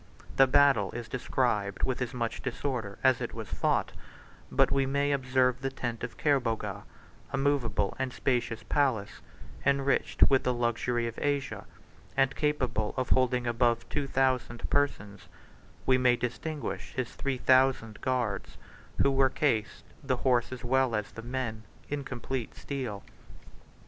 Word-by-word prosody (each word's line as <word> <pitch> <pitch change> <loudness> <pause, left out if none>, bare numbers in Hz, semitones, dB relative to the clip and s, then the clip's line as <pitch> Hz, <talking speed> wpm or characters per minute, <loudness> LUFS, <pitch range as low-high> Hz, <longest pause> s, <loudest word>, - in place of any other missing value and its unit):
The 135 - +6
battle 135 -7 +4
is 120 -1 -5
described 115 -5 -1
with 130 -1 0
as 125 - -1
much 120 -3 -3
disorder 120 -5 -3
as 130 -2 +4
it - - -4
was - - -6
fought; - - 0 0.6
but - - +3
we 135 -1 +2
may 140 +1 +1
observe 130 -2 +2
the 135 - -1
tent 120 -3 -4
of 120 - -5
Kerboga, 115 -8 0 0.5
a - - -1
movable 135 -7 +1
and 130 -1 -1
spacious 120 -3 -1
palace, 130 -9 0 0.4
enriched 140 0 +3
with 135 -2 +4
the 125 -1 0
luxury 120 0 0
of 115 -1 -5
Asia, 145 -1 -2 0.5
and 135 0 +3
capable 130 -8 0
of 130 - -1
holding 125 -1 +2
above 120 0 +1
two 145 -2 -2
thousand 130 -3 0
persons; 105 -9 -1 0.6
we 130 -1 +4
may 125 -1 +4
distinguish 125 -3 -4
his 130 -2 -3
three 135 -2 -2
thousand 130 -4 +3
guards, 120 -6 -2 0.5
who 140 - +4
were 135 0 +4
cased, 115 -7 0 0.2
the 130 -2 0
horse 125 -2 +2
as 130 - -7
well 130 -1 +2
as 105 -1 -3
the 115 - -8
men, 120 -2 -3 0.3
in 145 -1 -2
complete 130 -1 -4
steel. 125 -8 -5
125 Hz, 150 wpm, -29 LUFS, 115-135 Hz, 0.6 s, The